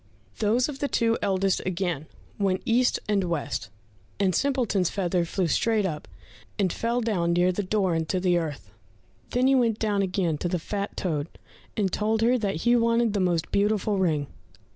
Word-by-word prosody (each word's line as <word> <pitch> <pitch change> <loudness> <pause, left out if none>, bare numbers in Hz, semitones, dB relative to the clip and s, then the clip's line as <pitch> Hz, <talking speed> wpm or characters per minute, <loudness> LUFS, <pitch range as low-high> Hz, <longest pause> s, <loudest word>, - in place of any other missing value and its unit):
Those 225 +4 +2
of 285 -3 -7
the 285 - 0
two 230 -4 +1
eldest 195 -1 +1
again 175 -5 -2 0.3
went 190 -2 0
east 245 +2 +2
and 205 -2 +2
west, 145 - -3 0.5
and 190 -2 +2
Simpleton's 235 - +1
feather 180 -3 0
flew 185 +2 -1
straight 215 +6 +1
up, 155 -5 -4 0.5
and 185 -4 +1
fell 235 +2 -1
down 180 -7 0
near 175 +1 +3
the 185 - -2
door 195 -2 0
into 165 +3 -1
the 180 -1 +2
earth. 145 - -6 0.6
Then 250 +1 +1
he 270 - +5
went 235 -5 +2
down 210 -3 0
again 180 -5 0
to - - -1
the 180 - 0
fat 200 +4 -4
toad, 155 -5 -1 0.5
and 195 -4 0
told 220 +1 0
her 240 +2 +4
that 195 -7 -2
he 240 0 +5
wanted 230 -1 +2
the 205 - 0
most 175 -3 0
beautiful 205 0 +1
ring. 155 -6 +1
195 Hz, 180 wpm, -26 LUFS, 175-225 Hz, 0.6 s, he